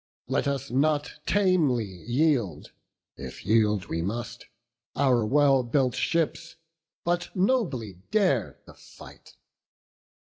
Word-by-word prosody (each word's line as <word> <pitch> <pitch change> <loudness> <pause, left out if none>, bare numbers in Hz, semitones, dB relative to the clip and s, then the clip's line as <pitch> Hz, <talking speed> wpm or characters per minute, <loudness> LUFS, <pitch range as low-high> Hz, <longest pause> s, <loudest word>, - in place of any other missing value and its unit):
Let - - 0
us 140 -1 -3
not 145 +3 +1 0.2
tamely 170 - +2
yield, 115 - -1 0.5
if - - -9
yield 105 -2 +2
we 80 - -3
must, 110 +7 -5 0.5
Our 130 -4 +3
well 135 +3 +4
built 125 +1 +1
ships, 165 0 -1 0.5
but 175 0 -1
nobly 175 - 0
dare 185 - +1
the - - -14
fight." - - -15
135 Hz, 105 wpm, -26 LUFS, 115-160 Hz, 0.5 s, well